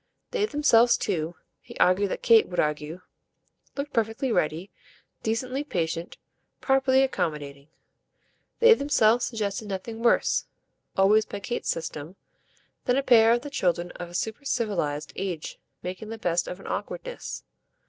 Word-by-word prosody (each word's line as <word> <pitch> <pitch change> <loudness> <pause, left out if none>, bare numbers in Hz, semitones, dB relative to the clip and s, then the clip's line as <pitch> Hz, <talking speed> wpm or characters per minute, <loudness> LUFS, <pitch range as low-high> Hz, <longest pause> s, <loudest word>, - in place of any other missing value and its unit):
They 430 -3 +1
themselves 245 - +4
too 170 -3 -2 0.3
he - - -12
argued 190 +2 +3
that - - -4
Kate 230 -2 +6
would 180 - -4
argue 150 +3 -1 0.8
looked 280 +1 -4
perfectly 230 +2 0
ready, 165 0 -1 0.5
decently 255 +5 -2
patient, 170 - -3 0.4
properly 265 0 +3
accommodating. 145 - -3 0.9
They 470 0 +8
themselves 245 - +3
suggested 215 -2 -3
nothing 205 +4 -5
worse 235 - +2 0.5
always 210 +3 +5
by 205 - -6
Kate's 240 +4 -4
system 160 +1 -4 0.7
than 250 +1 +2
a 275 - +1
pair 225 -3 +6
of 240 - +1
the 290 - -7
children 175 -7 0
of 175 - -8
a 175 - -10
supercivilised 210 - -2
age 180 -5 -4 0.2
making 185 +4 -6
the 225 - -5
best 175 -4 0
of 180 - -6
an - - -13
awkwardness. - - -5
215 Hz, 140 wpm, -26 LUFS, 175-245 Hz, 0.9 s, They